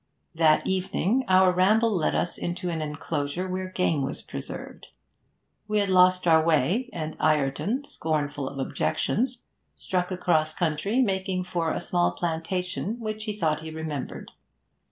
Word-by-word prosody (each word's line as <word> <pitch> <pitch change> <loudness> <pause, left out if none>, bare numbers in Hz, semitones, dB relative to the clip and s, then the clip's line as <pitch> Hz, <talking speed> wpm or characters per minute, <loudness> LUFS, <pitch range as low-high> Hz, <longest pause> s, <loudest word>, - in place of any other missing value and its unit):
That 160 -2 +4
evening 190 +6 0
our 185 0 +6
ramble 215 +5 +3
led 180 -7 +1
us 175 - -1
into 175 +1 -3
an 160 -1 -2
enclosure 150 +3 -3
where 185 0 -3
game 180 -5 +1
was 135 - -3
preserved. - - -8 0.8
We 215 0 0
had 200 -1 +1
lost 185 0 +5
our 160 -2 +5
way, 165 - +2
and 155 -2 -5
Ireton, 155 - +1
scornful 145 - -2
of 140 - -10
objections, 240 - -1 0.3
struck 180 -1 -2
across 160 -4 +1
country, 190 +9 +1
making 190 -3 -1
for 170 -3 -1
a - - -1
small 175 -1 +1
plantation 180 +6 -3
which 215 -1 -4
he 215 - -2
thought 160 -6 0
he 160 - -7
remembered. 155 -3 -5
180 Hz, 145 wpm, -26 LUFS, 155-190 Hz, 0.8 s, our